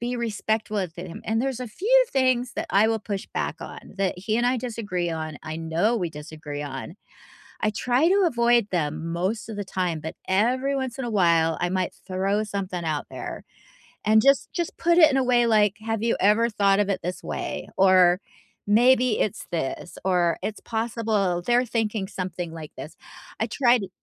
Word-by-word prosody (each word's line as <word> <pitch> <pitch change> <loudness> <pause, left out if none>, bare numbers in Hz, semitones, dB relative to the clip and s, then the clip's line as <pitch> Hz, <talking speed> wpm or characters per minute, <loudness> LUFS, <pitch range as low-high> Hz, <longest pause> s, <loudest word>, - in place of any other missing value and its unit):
be 245 +1 -2
respectful 220 -2 -2
of 180 -4 -3
him, 175 -1 -8
and 225 +1 +1
there's 265 -2 -2
a 250 - -4
few - - +3
things 255 -2 +2
that 330 +1 -2
I 210 +3 +4
will 225 - +1
push 200 -2 -5
back - - -2
on - - -8 0.2
that 190 -2 0
he 215 +4 -1
and 240 - +2
I 255 - +2
disagree 210 -8 -3
on, 155 -2 -4
I 155 0 -5
know 165 +8 0
we 175 -4 -1
disagree 150 -1 -7
on, 140 +4 -6 0.7
I 215 - +2
try 250 +8 +2
to 395 +1 +4
avoid 235 -6 +3
them 160 -1 -2
most 190 +7 -2
of 215 - -6
the 205 - -2
time, 180 -4 -2
but 160 - -6
every 255 +8 +1
once 260 -1 -3
in 255 - -2
a - - -3
while, 170 -4 +3
I 175 - +1
might 185 0 -1
throw 195 +3 0
something 195 -4 -4
out 155 -2 -2
there - - -6 0.6
and 220 +1 +5
just 275 0 +3
just 345 -1 -3
put 340 +1 +2
it 315 - +8
in 270 - +1
a 265 - +3
way 245 -1 +3
like, 210 -2 +3
"Have 225 -1 -1
you 230 - +2
ever 215 +4 +4
thought 200 -1 +3
of 205 - +2
it 190 - 0
this 180 +2 -4
way, - - -4
or, 185 -1 +5 0.5
maybe 245 +2 +4
it's 210 - -1
this, 165 +1 -4
or, 175 -3 +2
it's 215 - -3
possible 220 -5 -1
they're 245 +1 +3
thinking 220 -4 -1
something 180 -3 -5
like 160 -2 -8
this," 155 +2 -8 0.4
I 225 - 0
tried 245 -1 +3
t 195 - -6
210 Hz, 195 wpm, -25 LUFS, 180-240 Hz, 0.7 s, it